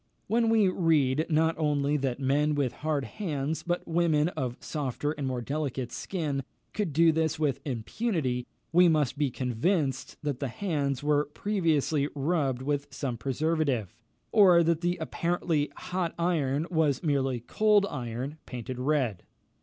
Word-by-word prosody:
When 230 +1 +2
we 220 -3 +4
read 155 -5 +2
not 160 +1 +3
only 145 -1 +1
that 135 -2 -2
men 145 +3 +2
with 135 -4 0
hard 150 -2 -2
hands, 155 -6 -3
but 175 0 -2
women 165 -2 +2
of 125 -7 -4
softer 145 -1 -3
and 145 -3 -3
more 125 -2 -2
delicate 135 -3 -3
skin, 150 -7 -3 0.3
could 205 -6 -1
do 165 +3 +5
this 160 -1 0
with 150 -4 0
impunity, 130 - -2 0.2
we 175 +2 +6
must 150 -6 +2
be 145 -1 +1
convinced 130 - -1
that 145 -4 -2
the 140 - -1
hands 140 - -2
were 150 0 +2
previously 155 -5 0
rubbed 140 -3 0
with 145 0 -1
some 135 -2 -3
preservative, 135 - -1 0.4
or 185 -6 +6
that 165 0 +1
the 175 0 0
apparently 165 -2 -1
hot 180 -2 -3
iron 160 -4 +1
was 155 -4 +1
merely 135 -5 +1
cold 210 - +3
iron 130 - -5
painted 125 0 -6
red. 130 -8 0
150 Hz, 145 wpm, -28 LUFS, 135-165 Hz, 0.4 s, we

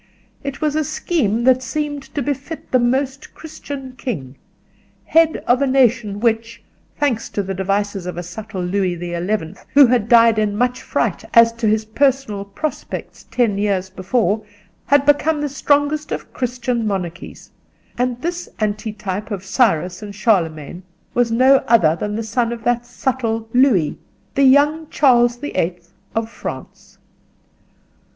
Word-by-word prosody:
It 275 +1 -5
was 305 -1 0
a 310 - +1
scheme 280 - -1
that 255 0 +4
seemed 290 +3 -3
to 285 - 0
befit 285 +4 -5
the 255 - +4
Most 265 +3 -1
Christian 285 -4 -8
King, 155 - -5 0.7
head 325 -1 +3
of 250 +2 +3
a 280 - +2
nation 240 -6 +2
which, 230 -1 -1 0.3
thanks 260 -6 0
to 205 - -2
the 195 0 -4
devices 195 0 -2
of 180 - -5
a 175 - -4
subtle 190 +2 -6
Louis 185 0 0
the 175 0 -6
Eleventh 175 -1 -3
who 285 -1 +9
had 235 -3 +1
died 230 -2 +6
in 210 -1 0
much 250 +2 0
fright - - -1
as 230 0 +7
to 230 -1 -2
his 215 +1 +1
personal 250 -3 0
prospects 200 +10 -6
ten 225 -5 +1
years 195 -2 -1
before, 205 +2 0 0.4
had 285 0 +4
become 295 +2 +3
the 295 - -1
strongest 290 +2 0
of - - -5
Christian 245 -2 -2
monarchies; 180 -4 -5 0.4
and 245 0 -1
this 350 +1 -3
antitype 210 -1 -3
of 195 -3 -5
Cyrus 180 - +1
and 205 -1 -8
Charlemagne 175 - 0 0.3
was 240 -1 +1
no 260 +4 +5
other 175 -9 +4
than 210 +4 -3
the 225 - -2
son 230 +2 -1
of 235 -1 -6
that 240 0 0
subtle 235 -3 -2
Louis—the 245 - +1
young 295 +4 +4
Charles 240 -4 +4
the 290 +4 -6
Eighth 175 0 -2 0.2
of 225 0 0
France. 230 - -9
230 Hz, 150 wpm, -19 LUFS, 200-270 Hz, 0.7 s, who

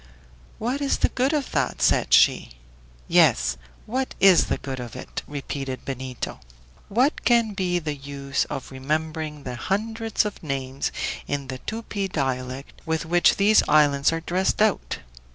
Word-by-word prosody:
"What 250 +5 -2
is 280 - +1
the - - +2
good 260 +2 +1
of 295 -4 -1
that?" 135 -4 0
said - - +2
she. - - +5 0.6
"Yes; 60 0 +4 0.3
what 260 +4 -2
is 195 -3 +6
the - - 0
good 135 -2 -6
of 120 -3 -7
it?" - - -6
repeated 135 -2 -5
Benito. 130 -2 -5 0.5
"What 255 +9 +2
can 235 -3 +3
be 185 -3 0
the 155 -3 -2
use 140 0 -3
of 135 - -6
remembering 155 +2 -3
the 125 - -5
hundreds 220 - -1
of 210 - -5
names 135 -2 -3 0.4
in 140 -2 -3
the 130 -1 -5
'Tupi' 215 - -4
dialect 130 -4 -3
with 160 0 -1
which 175 +1 +4
these 210 +2 +5
islands 145 -2 +4
are 165 0 -2
dressed 180 +3 0
out? 215 -1 +1
155 Hz, 155 wpm, -24 LUFS, 135-210 Hz, 0.6 s, is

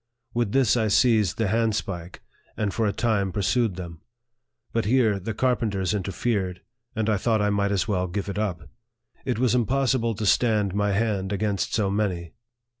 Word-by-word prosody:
With 120 -4 0
this 130 -3 +3
I 110 -3 +1
seized 110 -3 +3
the 115 - +1
handspike, 100 -5 -2 0.3
and 105 -3 -1
for 110 +2 +1
a - - +1
time 110 -4 0
pursued 105 +1 +1
them. 85 -3 -8 0.7
But 115 - 0
here 110 -3 +3
the 105 +3 -5
carpenters 105 -7 0
in 105 - 0
terfered, 95 -1 -2 0.3
and 110 -1 -1
I 110 -2 +2
thought 110 +2 +1
I 105 0 +1
might 100 0 +1
as 100 0 0
well 95 -3 0
give 100 +2 -4
it 100 +1 -3
up. 90 -6 -3 0.6
It - - -1
was 125 -1 +2
impossible 125 -1 +1
to 105 - -3
stand 105 -3 +2
my 105 0 +1
hand 100 -2 0
against 100 0 -1
so 100 -3 +1
many. 95 -5 -2
105 Hz, 180 wpm, -25 LUFS, 95-115 Hz, 0.7 s, this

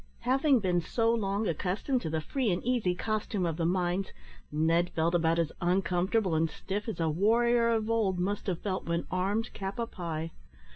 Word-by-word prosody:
Having 265 +1 +3
been 180 -2 +1
so 230 +6 +1
long 205 -1 0
accustomed 195 - -1
to 160 - -3
the 160 0 -1
free 255 - -1
and 175 - -1
easy 235 -7 +1
costume 215 -2 -1
of 165 -2 -2
the 165 -1 +1
mines, 180 +1 0 0.4
Ned 165 +3 +2
felt 165 +1 +1
about 165 -1 +2
as 165 -2 +1
uncomfortable 185 +2 +1
and 160 +1 +2
stiff 205 +7 -5
as 220 - -5
a 165 - +1
warrior 230 +8 +3
of 220 -2 +1
old 220 -5 +1
must 195 +4 -2
have 180 -3 -1
felt 190 -2 -2
when 170 0 -1
armed 200 +5 -1
cap 195 0 -5
a 235 - 0
pie. 165 -6 -5
190 Hz, 190 wpm, -30 LUFS, 170-225 Hz, 0.4 s, Having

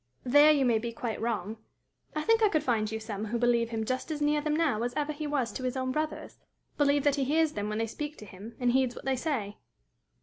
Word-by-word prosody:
"There 290 +4 +6
you 285 -3 +3
may 235 -3 +3
be 235 +1 -4
quite 230 -1 -4
wrong. 220 -2 -2 0.6
I 305 - -1
think 455 +3 +3
I 430 - +5
could 310 -5 +1
find 220 -4 0
you 220 - -3
some 215 -1 -5
who 230 +2 -2
believe 235 -1 +2
him 225 -1 -2
just 255 +6 -3
as 305 -2 -3
near 295 0 +2
them 300 0 0
now 305 -9 +1
as 245 +1 -2
ever 300 0 -1
he 300 +1 -5
was 275 -5 -1
to 260 - -6
his 255 +1 -2
own 260 0 -1
brothers 305 +3 -4 0.4
believe 285 -1 +2
that 290 -1 +2
he 275 - +1
hears 310 +3 +2
them 205 -3 -3
when 215 - -2
they 225 - 0
speak 295 +6 -6
to 210 - -10
him, 205 +4 -11
and 245 -1 +2
heeds 255 -1 +1
what - - -10
they 270 0 +1
say." 245 -8 -3
255 Hz, 260 wpm, -29 LUFS, 225-295 Hz, 0.6 s, There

